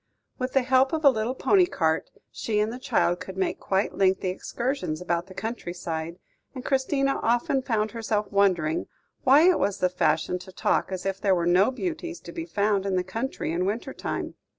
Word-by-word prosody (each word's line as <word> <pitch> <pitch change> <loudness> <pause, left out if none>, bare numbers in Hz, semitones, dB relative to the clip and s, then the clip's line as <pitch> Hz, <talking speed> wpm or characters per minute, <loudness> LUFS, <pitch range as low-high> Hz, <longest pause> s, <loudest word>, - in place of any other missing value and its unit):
With 255 0 -2
the 270 - +3
help 260 +2 +3
of 315 -1 -1
a 280 - +9
little 230 +2 -2
pony 370 +5 +4
cart, 160 - 0 0.2
she 215 -2 -1
and 215 +2 0
the 250 - -7
child 175 -8 +1
could 190 0 -8
make 190 - -1
quite 195 +1 0
lengthy 190 -1 +2
excursions 235 - -3
about 175 0 -2
the 185 - -13
country 220 -5 -5
side, 165 0 -4 0.4
and 255 - -7
Christina 275 0 +1
often 240 +3 +1
found 220 -4 -1
herself 220 -2 -1
wondering 185 -6 +2 0.4
why 285 +6 +7
it 370 - +4
was 200 - 0
the 180 - +2
fashion 165 0 0
to 190 - -11
talk 185 - 0
as 185 -1 -4
if 195 0 -2
there 195 -2 +3
were 170 -1 0
no 180 +5 +4
beauties 335 +4 -4
to - - -9
be 330 -1 -5
found 200 - +1
in 190 - 0
the 180 - +1
country 225 0 -3
in 175 +2 0
winter 230 +6 -3
time. - - -4
210 Hz, 200 wpm, -26 LUFS, 180-260 Hz, 0.4 s, a